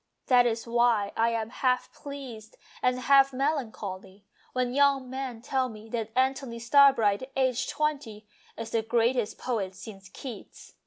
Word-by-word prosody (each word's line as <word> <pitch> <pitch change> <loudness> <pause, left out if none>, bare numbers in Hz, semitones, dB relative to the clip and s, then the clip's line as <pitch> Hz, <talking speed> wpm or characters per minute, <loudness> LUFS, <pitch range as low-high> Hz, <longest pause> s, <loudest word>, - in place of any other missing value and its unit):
That 245 -1 +5
is 230 -1 -2
why 235 -3 +2
I 230 +1 +2
am 225 -1 -3
half 250 -1 0
pleased 260 -7 -9 0.2
and 250 0 +1
half 275 +1 +5
melancholy 220 -9 -4 0.3
when 250 -1 -1
young 275 -1 +3
men 260 -3 -5
tell 260 -1 0
me 220 0 -12
that 225 -2 -3
Antony 260 -2 0
Starbright, 240 -2 +4
aged 255 -2 0
twenty, 280 -9 -3 0.3
is 230 0 -6
the 225 - +1
greatest 230 0 0
poet 200 -7 -3
since 195 -1 -11
Keats. 235 +1 -10
240 Hz, 145 wpm, -27 LUFS, 220-265 Hz, 0.3 s, That